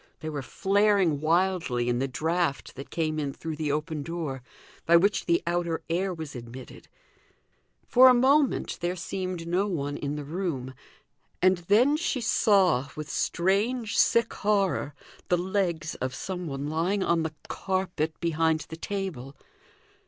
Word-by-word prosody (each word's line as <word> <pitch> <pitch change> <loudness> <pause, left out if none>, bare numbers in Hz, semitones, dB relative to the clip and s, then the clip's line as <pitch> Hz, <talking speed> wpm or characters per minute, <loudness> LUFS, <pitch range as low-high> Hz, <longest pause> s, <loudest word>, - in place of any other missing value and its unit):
They 155 - -4
were 145 -2 -4
flaring 195 -2 +2
wildly 165 -7 +1
in 120 0 +1
the 135 - 0
draught 160 +2 -1
that 135 +1 -9
came 155 -2 -1
in 140 -2 -2
through 160 +2 -5
the 150 -1 -2
open 150 +1 -2
door, 155 -4 -4 0.5
by 170 - +6
which 200 +4 +1
the 170 0 +2
outer 170 -1 -1
air 185 +3 0
was 160 -5 -7
admitted; 120 +1 -10 1.0
for 255 +1 +7
a - - +7
moment 270 +3 +2
there 175 +1 -1
seemed 185 -1 -4
no 185 +4 +1
one 145 -6 -3
in 145 0 -3
the 150 - -5
room, 145 -5 -4 0.7
and 185 0 +4
then 220 - +4
she 310 -5 -1
saw, 195 - +3
with 150 -1 -6
strange 210 +6 0
sick 235 -1 +3
horror, 195 -8 0 0.3
the 180 - +3
legs 180 -3 -1
of 130 0 -4
some 180 -2 -5
one 140 0 -4
lying 175 +6 0
on 170 -2 +2
the 160 -1 -4
carpet 180 -5 -2
behind 160 -1 +1
the 160 - -7
table. 165 -9 -5
170 Hz, 150 wpm, -27 LUFS, 150-190 Hz, 1.0 s, for